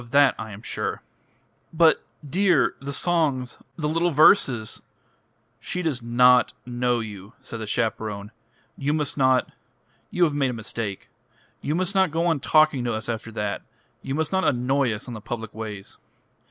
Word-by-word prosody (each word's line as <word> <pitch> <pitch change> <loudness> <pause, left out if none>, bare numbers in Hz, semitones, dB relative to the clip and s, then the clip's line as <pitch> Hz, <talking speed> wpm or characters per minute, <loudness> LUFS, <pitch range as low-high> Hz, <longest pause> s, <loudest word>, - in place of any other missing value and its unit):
"Of 120 - -14
that 140 +1 +5
I 110 0 -5
am 105 +1 -10
sure." - - -3 0.7
"But, 165 -1 +4 0.2
dear 180 +1 +3
the 140 +1 -5
songs 140 -5 0 0.2
the 150 -3 -2
little 165 +3 +1
verses 135 - +4 0.4
" 115 +1 -43
"She 180 - -2
does 145 -7 -1
not 125 +1 +4
know 120 -1 0
you," 105 -1 -9
said 130 -3 -7
the 110 - -5
chaperone. 105 -2 -2 0.4
"You 145 +2 -1
must 150 0 -1
not.... 130 -2 +2 0.6
You 180 - +1
have 155 -4 +3
made 140 -2 +1
a - - -3
mistake. 110 -3 -5 0.5
You 150 - -1
must 185 +2 -1
not 190 -2 +3
go 165 +3 0
on 165 -4 +2
talking 155 -2 +3
to 120 - 0
us 110 +2 -5
after 115 0 -4
that. 105 -2 -2 0.4
You 135 - -3
must 155 -1 -1
not 190 0 +1
annoy 130 -1 +2
us 110 +3 -5
on 125 - -6
the 110 - -7
public 115 0 -6
ways." 105 -3 -7
130 Hz, 175 wpm, -24 LUFS, 115-155 Hz, 0.7 s, that